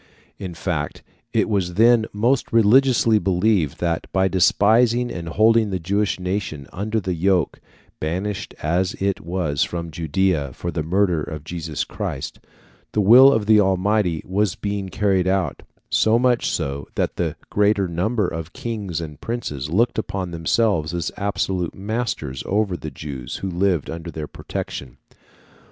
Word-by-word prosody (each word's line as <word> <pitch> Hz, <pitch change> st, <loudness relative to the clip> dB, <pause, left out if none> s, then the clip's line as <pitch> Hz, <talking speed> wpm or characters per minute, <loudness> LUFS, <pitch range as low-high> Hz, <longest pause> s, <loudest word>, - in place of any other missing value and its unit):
] -, -, -36 dB
In 85 Hz, -, -9 dB
fact, 80 Hz, -4 st, -3 dB, 0.3 s
it -, -, +2 dB
was 95 Hz, -5 st, -1 dB
then 115 Hz, +1 st, +5 dB
most 120 Hz, +6 st, +1 dB
religiously 115 Hz, 0 st, +4 dB
believed 90 Hz, -4 st, +1 dB
that, 85 Hz, -1 st, -1 dB
by 95 Hz, 0 st, +2 dB
despising 115 Hz, +6 st, +3 dB
and 85 Hz, -2 st, -5 dB
holding 110 Hz, +4 st, +4 dB
the 95 Hz, -, -1 dB
Jewish 100 Hz, +4 st, -1 dB
nation 90 Hz, -6 st, -3 dB
under 105 Hz, +4 st, -1 dB
the 95 Hz, -3 st, -2 dB
yoke, 90 Hz, -1 st, +1 dB, 0.4 s
banished 95 Hz, +6 st, -3 dB
as 90 Hz, +4 st, 0 dB
it 100 Hz, 0 st, -1 dB
was 85 Hz, -4 st, -2 dB
from 85 Hz, -1 st, -4 dB
Judæa 80 Hz, -3 st, 0 dB
for 85 Hz, -, -4 dB
the 85 Hz, -, -2 dB
murder 90 Hz, 0 st, +1 dB
of 75 Hz, -1 st, -6 dB
Jesus 80 Hz, -2 st, -4 dB
Christ, 65 Hz, -, -5 dB, 0.5 s
the -, -, +1 dB
will 120 Hz, +7 st, +8 dB
of 110 Hz, -6 st, +1 dB
the 110 Hz, 0 st, +6 dB
Almighty 95 Hz, -2 st, +1 dB
was 95 Hz, 0 st, 0 dB
being 100 Hz, -2 st, -3 dB
carried 95 Hz, -1 st, +1 dB
out, 95 Hz, -1 st, 0 dB, 0.3 s
so 110 Hz, +1 st, +4 dB
much 125 Hz, -1 st, +2 dB
so 70 Hz, +1 st, -3 dB
that -, -, -1 dB
the -, -, -1 dB, 0.2 s
greater 100 Hz, -1 st, +2 dB
number 95 Hz, +5 st, 0 dB
of 80 Hz, +1 st, -6 dB
kings 105 Hz, -8 st, -4 dB
and 75 Hz, -2 st, -8 dB
princes 75 Hz, -, -4 dB
looked 110 Hz, +8 st, +2 dB
upon 95 Hz, -4 st, -3 dB
themselves 85 Hz, -1 st, +1 dB
as 85 Hz, -3 st, -2 dB
absolute 95 Hz, -3 st, -2 dB
masters 100 Hz, -, -3 dB
over 100 Hz, -2 st, +1 dB
the 80 Hz, -, -6 dB
Jews 70 Hz, -2 st, -7 dB
who 95 Hz, -, -2 dB
lived 90 Hz, -3 st, +1 dB
under 85 Hz, +1 st, -6 dB
their 80 Hz, -1 st, -5 dB
protection. 65 Hz, -3 st, -6 dB
95 Hz, 155 wpm, -22 LUFS, 80-105 Hz, 0.5 s, will